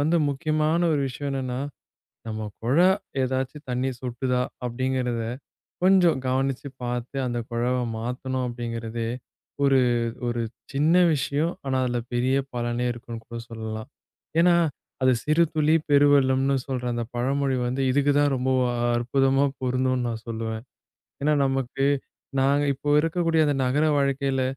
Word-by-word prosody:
வந்து 160 +4 +2
முக்கியமான 155 +3 +1
ஒரு 145 - +1
விஷயம் 140 +2 -4
என்னன்னா, 130 -2 -2 0.7
நம்ம 110 -1 -4 0.2
குழா 140 +11 +4 0.4
ஏதாச்சு 130 +2 -2
தண்ணி 125 +2 0
சொட்டுதா 125 0 -1 0.2
அப்டிங்கறத 125 -1 -1 0.6
கொஞ்சம் 180 -6 +5
கவனிச்சு 135 +1 0 0.2
பாத்து, 120 +2 -4
அந்த 120 -1 -2
குழாவ 120 +2 0 0.2
மாத்தணும் 125 +2 -3
அப்டிங்கறதே 115 -1 -4 0.6
ஒரு 135 -1 +5 0.5
ஒரு 120 0 -1 0.3
சின்ன 150 +5 +3 0.2
விஷயம். 150 +4 0
ஆனா, 130 -1 0
அதுல 120 -1 -1
பெரிய 125 +2 +2 0.2
பலனே 120 0 -1
இருக்கும்னு 115 -1 -8
கூட 120 0 -6
சொல்லலாம். 110 -1 -6 0.5
ஏன்னா, 175 0 +5 0.5
அது 130 - +5
சிறு 155 +3 +4
துளி 155 +1 +4
பெரு 145 0 +6
வெள்ளம்னு 135 0 +3
சொல்ற 130 -2 -3
அந்த 120 0 -2
பழமொழி 135 +2 +1
வந்து 130 +2 -1
இதுக்கு 145 +2 +3
தான் 145 -1 +3
ரொம்ப 130 +1 -1 0.5
அற்புதமா 135 +3 +2 0.2
பொருந்தும்னு 130 -1 0
நான் 115 -1 -5
சொல்லுவேன். 110 0 -4 0.6
ஏன்னா 150 +1 +3
நமக்கு 135 0 -1 0.6
நாங்க 140 +2 +3
இப்ப 145 +2 -1
இருக்கக்கூடிய 165 0 +1
அந்த 145 - +2
நகர 140 +5 +2
வாழ்க்கையில 140 -1 +1
130 Hz, 130 wpm, -25 LUFS, 120-140 Hz, 0.7 s, பெரு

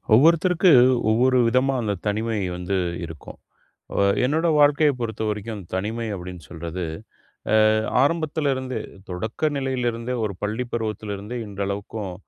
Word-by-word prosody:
ஒவ்வொருத்தருக்கு 170 - +5 0.4
ஒவ்வொரு 125 +3 +3
விதமா 130 +3 +2
அந்த 105 -2 -1
தனிமை 110 +1 -1 0.2
வந்து 90 +2 -2 0.3
இருக்கும். 80 -2 -10 0.6
அ - - -2 0.3
என்னோட 160 +6 +1
வாழ்க்கைய 145 +1 +5
பொறுத்தவரைக்கும், 110 -1 -3
தனிமை 110 +5 -2
அப்பிடின்னு 90 -4 -9
சொல்றது, 85 +1 -5 0.9
அ - - +3 0.3
ஆரம்பத்திலிருந்தே 140 -5 0 0.3
தொடக்க 110 - -2
நிலையிலிருந்தே, 125 -3 -2
ஒரு 105 - -2
பள்ளி 110 +4 -1
பருவத்திலிருந்தே 105 -1 -4
இன்றளவுக்கும் 100 0 -4
115 Hz, 110 wpm, -23 LUFS, 100-135 Hz, 0.9 s, ஒவ்வொருத்தருக்கு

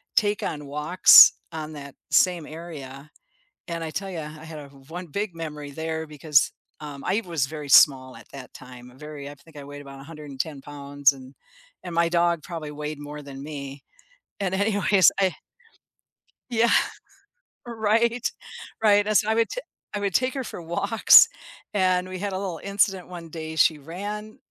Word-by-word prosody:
take 205 -1 +2
on 150 -2 -4
walks 150 +5 +7 0.2
on 155 -1 -6
that 140 -2 -9 0.2
same 175 -4 +3
area, 150 -3 -10 0.6
and 165 -1 -4
I - - -4
tell 195 +2 -4
you, 175 - -6
I 150 - -5 0.2
I - - -11
had 160 -2 -8
a 145 - -10 0.2
1 175 +1 -7
big 200 +3 -3
memory 150 -3 -7
there 160 +1 -4
because 150 -1 +2 0.3
um, 145 -2 -8
I 205 +5 +1
was 165 -6 -1
very 150 -1 -8
small 130 -2 +5
at - - -15
that 135 -2 -10
time, 125 -1 -13
very 150 -1 -8
I 145 - -10
think 160 +2 -21
I 140 - -8
weighed 145 0 -10
about 140 -1 -11
110 150 -1 -6
pounds 145 0 +1
and 130 0 -13 0.5
and 170 -1 -6
my 170 0 +3
dog 170 -2 +1
probably 160 -4 -6
weighed 150 0 -6
more 150 0 -8
than 135 -1 -10
me, 140 -2 -8 0.6
and 190 -1 -1
anyways, 200 -2 +4
I 190 -2 +2 1.2
Yeah, 235 0 +2 1.0
right, 230 +1 0 0.5
right, 205 -1 +4
and, 215 - +4
so, 215 - +1
I 220 - +2
would 230 0 +2
ta - - -5 0.3
I 205 - -2
would 200 -2 -2
take 255 +2 +1
her 265 -2 -3
for 185 - -8
walks, 170 +7 +6 0.5
and 185 -2 +1
we 185 -1 -7
had 200 -1 -3
a - - -2
little 185 -5 -4
incident 195 -2 0
one 170 -2 -9
day, 160 0 -7
she 160 0 +4
ran 205 +8 -7
160 Hz, 175 wpm, -24 LUFS, 145-195 Hz, 1.2 s, walks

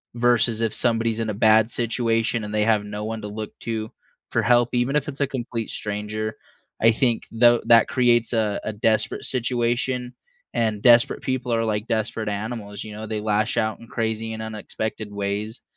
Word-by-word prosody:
versus 120 -2 +2
if 115 -2 0
somebody's 115 -2 +1
in 115 -1 -1
a - - -1
bad 110 +1 +4
situation 115 -1 0
and 105 0 -6
they 105 0 +2
have 110 -2 +3
no 105 0 -5
one 110 0 -4
to - - -4
look 105 +1 -6
to 110 -1 -4 0.4
for - - +1
help 120 0 +4
even 125 +3 +1
if 150 -1 0
it's 140 - -7
a - - +4
complete 120 -4 -4
stranger. 105 +1 -4 0.4
I 115 - +6
think 115 0 +1
tho 120 +1 +5
that 115 -1 +6
creates 120 -2 +2
a 110 -3 +1
a 110 - -3
desperate 110 +1 0
situation, 125 0 -1 0.4
and 110 -3 0
desperate 120 0 +5
people 130 -2 -1
are 115 0 +1
like 105 0 -1
desperate 110 0 -1
animals, 105 -1 -5
you 110 - -8
know, 110 +1 -6
they 105 -1 -3
lash 105 0 0
out 110 0 0
in 115 - -13
crazy 110 -1 -2
and 110 - -6
unexpected 110 0 -5
ways 100 +3 -3
110 Hz, 185 wpm, -23 LUFS, 110-120 Hz, 0.4 s, I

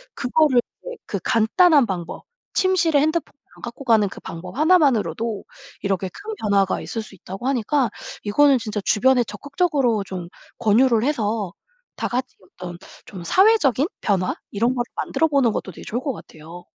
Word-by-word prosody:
그거를 265 -1 +3 0.2
이제 - - -7
그 200 - -2
간단한 275 +5 +4
방법, 175 -4 -5 0.3
침실에 355 -6 +3
핸드폰 315 +3 0 0.2
안 - - -17
갖고 245 +3 -8
가는 220 -4 +4
그 - - -10
방법 180 +8 -8
1 325 +5 +5
만으로도 230 - 0 0.4
이렇게 195 -1 -1
큰 430 - -8
변화가 200 -3 +1
있을 225 - -4
수 215 -2 -13
있다고 195 +7 -7
하니까 270 0 +1 0.3
이거는 275 +6 +4
진짜 210 -2 -4
주변에 250 +3 +3
적극적으로 275 - 0
좀 185 -3 -7 0.3
권유를 230 +1 +3
해서 215 - -1 0.4
다 - - -2
같이 255 +1 -3
어떤 180 -1 -9 0.3
좀 185 -4 -9
사회적인 345 - +4
변화 190 -3 0 0.2
이런 235 +5 +1
거를 240 - 0
만들어보는 280 -6 +1
것도 190 - -4
되게 - - -12
좋을 240 +3 -2
것 275 +1 -2
같아요. 170 -2 -12
235 Hz, 340 characters per minute, -22 LUFS, 200-285 Hz, 0.4 s, 1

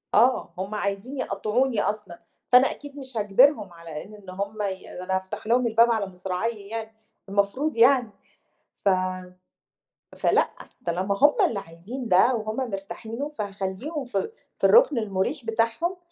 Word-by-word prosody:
آه 250 +4 +3
هُم 195 +3 -3
عايزينِ 200 +7 -3
يقَطعوني 225 +2 0
أصلًا 205 -4 -3 0.3
فأنا 250 +2 +6
أكيد 290 -1 -10
مش 260 -4 -8
هاجبرهم 210 0 +4
على 165 -2 -8
إن 205 -2 -13
هُم 200 +3 -4
ي 190 -2 -3
ده 180 - -6
أنا 190 +1 -1
هافتح 190 +3 -4
لهم 240 +1 +3
الباب 230 +1 +5
على 220 -3 +1
مصراعيه 195 +3 -4
يعني 225 -1 -5 0.4
المفروض 205 +9 0
يعني، 245 -1 +5 0.6
ف 200 - +1 1.3
فلأ - - +3 0.4
طالما 185 +3 0
هُم 295 +1 +6
اللي 205 - -3
عايزين 195 +10 -7
ده 225 +6 +5
وهُم 215 -1 -3 0.2
مرتاحين 200 +3 -6
له 290 +1 -2
فهاخلّيهم 210 - -4
في 200 - -2 0.2
في - - -23
الرُكن 470 - +6
المُريح 215 +5 -1
بتاعهم. 230 +11 0
215 Hz, 145 wpm, -25 LUFS, 195-250 Hz, 1.3 s, فأنا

